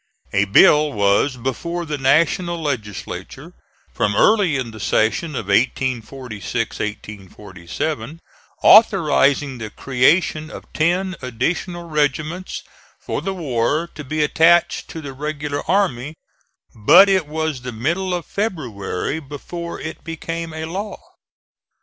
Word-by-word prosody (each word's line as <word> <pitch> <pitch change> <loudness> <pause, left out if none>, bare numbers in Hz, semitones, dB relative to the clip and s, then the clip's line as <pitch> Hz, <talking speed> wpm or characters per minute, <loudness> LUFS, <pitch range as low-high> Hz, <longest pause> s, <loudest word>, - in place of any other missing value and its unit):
A 100 +1 +3
bill 150 +9 +5
was 105 +5 +2
before 170 +8 -3
the 150 -2 -4
National 170 +5 +2
Legislature 125 - -5 0.4
from 105 -1 0
early 200 - +4
in 125 -3 -4
the 110 - -11
session 110 - 0
of 110 - -3
1846 105 -5 -3
7, 160 +1 -3 0.4
authorizing 145 - +5
the 110 -1 -5
creation 155 - +1
of - - -10
ten 180 +4 +1
additional 165 +8 -2
regiments 155 +4 -2 0.4
for - - -4
the 195 0 -3
war 150 0 0
to 150 - -8
be 150 +3 -1
attached 165 +3 +3
to 160 - -7
the 140 -3 -7
regular 145 +1 -4
army, 160 -8 0 0.6
but 175 - +7
it 190 -5 +2
was 155 -3 -3
the 125 0 -6
middle 170 +12 -1
of 175 -3 -5
February 140 - -3
before 165 +4 -7
it 160 - -7
became 165 0 -5
a 160 0 -5
law. 195 +5 -5
150 Hz, 120 wpm, -20 LUFS, 120-170 Hz, 0.6 s, but